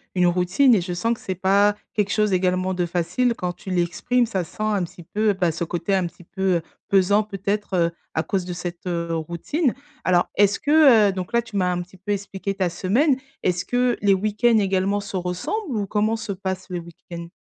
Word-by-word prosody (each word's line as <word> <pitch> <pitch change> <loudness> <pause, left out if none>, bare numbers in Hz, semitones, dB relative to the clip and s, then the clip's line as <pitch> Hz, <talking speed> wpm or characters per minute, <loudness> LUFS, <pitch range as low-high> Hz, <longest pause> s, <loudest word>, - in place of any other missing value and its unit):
une 180 -1 +4
routine 180 +9 +3
et 190 - +2
je 180 0 -4
sens 230 +7 0
que - - -18
c'est 190 - -4
pas 200 +3 +3 0.2
quelque 205 -2 0
chose, 210 -2 +2
également, 185 0 +1
de 180 -1 0
facile. 180 +9 0
Quand 180 -4 -2
tu 190 - -11
l'exprimes, 180 +8 +1
ça 195 -6 -2
sent 190 - -11
un 210 -4 +1
petit 170 0 -9
peu, 210 +4 +1
bah, 180 -3 +1
ce 170 - -3
côté 175 +4 -1
un 185 -2 +1
petit 175 - -15
peu, 190 +3 -9 0.2
heu, - - -4 0.3
pesant, 200 +2 +4
peut-être, 205 0 -3
heu, 170 -1 +2 0.2
à 160 - 0
cause 190 -3 -2
de 180 - -4
cette, 175 0 -6
heu, 170 -1 -2
routine. 170 - -1 0.3
Alors, 180 -1 +3
est-ce 205 -1 +3
que 285 -8 +6
heu, - - +1
donc 185 +4 -5
là, 235 - +4
tu 220 -3 -12
m'as 180 -1 +2
un 175 0 -1
petit 180 +2 -12
peu 190 +3 -5
expliqué 195 0 -4
ta 190 -2 0
semaine, 250 - +2 0.3
est-ce 180 0 0
que 245 -1 +1
les 200 -1 +4
week-ends 215 +4 +2
également 195 +1 +1
se 200 -1 -5
ressemblent? 220 - -3
Ou 200 -1 -2
comment 215 +3 +1
se 225 -2 -5
passent 190 -1 -4
les 180 -1 -3
week-ends? 170 0 -10
190 Hz, 220 wpm, -23 LUFS, 180-210 Hz, 0.3 s, que